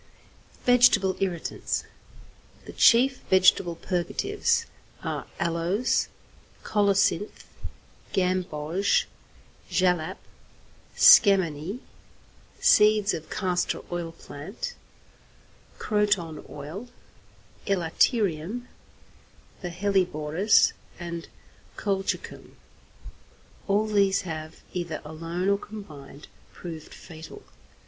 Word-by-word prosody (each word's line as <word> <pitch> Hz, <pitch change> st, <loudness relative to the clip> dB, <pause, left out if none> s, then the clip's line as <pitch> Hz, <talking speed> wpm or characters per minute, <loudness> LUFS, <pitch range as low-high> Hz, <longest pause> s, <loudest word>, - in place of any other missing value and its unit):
XXVIII. -, -, -29 dB
VEGETABLE 235 Hz, -7 st, +5 dB
IRRITANTS 180 Hz, -4 st, -2 dB, 0.8 s
The -, -, -9 dB
chief 255 Hz, +3 st, +5 dB
vegetable 185 Hz, -2 st, +4 dB
purgatives 175 Hz, +1 st, -1 dB, 0.4 s
are -, -, -4 dB
aloes, 170 Hz, +8 st, 0 dB, 0.6 s
colocynth, 200 Hz, -1 st, +1 dB, 0.7 s
gamboge, 180 Hz, -1 st, 0 dB, 0.6 s
jalap, 180 Hz, -1 st, +1 dB, 0.8 s
scammony, 190 Hz, -, +5 dB, 0.8 s
seeds 210 Hz, -1 st, +5 dB
of 160 Hz, -2 st, -6 dB
castor 180 Hz, -2 st, -1 dB
oil 175 Hz, -1 st, -3 dB
plant, 165 Hz, +4 st, -8 dB, 1.0 s
croton 200 Hz, -7 st, 0 dB
oil, 155 Hz, +11 st, -8 dB, 0.8 s
elaterium, 195 Hz, -, +1 dB, 1.0 s
the 180 Hz, -, -4 dB
hellebores, 180 Hz, -1 st, +2 dB, 0.3 s
and 170 Hz, -1 st, -6 dB, 0.5 s
colchicum. 195 Hz, -1 st, -3 dB, 1.1 s
All 205 Hz, +2 st, +2 dB
these 200 Hz, -2 st, +2 dB
have, 155 Hz, -3 st, -7 dB
either 170 Hz, -3 st, -3 dB
alone 165 Hz, +4 st, -4 dB
or 200 Hz, 0 st, +2 dB
combined, 150 Hz, -10 st, -11 dB, 0.3 s
proved 160 Hz, -3 st, -9 dB
fatal. 165 Hz, -, -11 dB
185 Hz, 75 wpm, -26 LUFS, 165-200 Hz, 1.1 s, VEGETABLE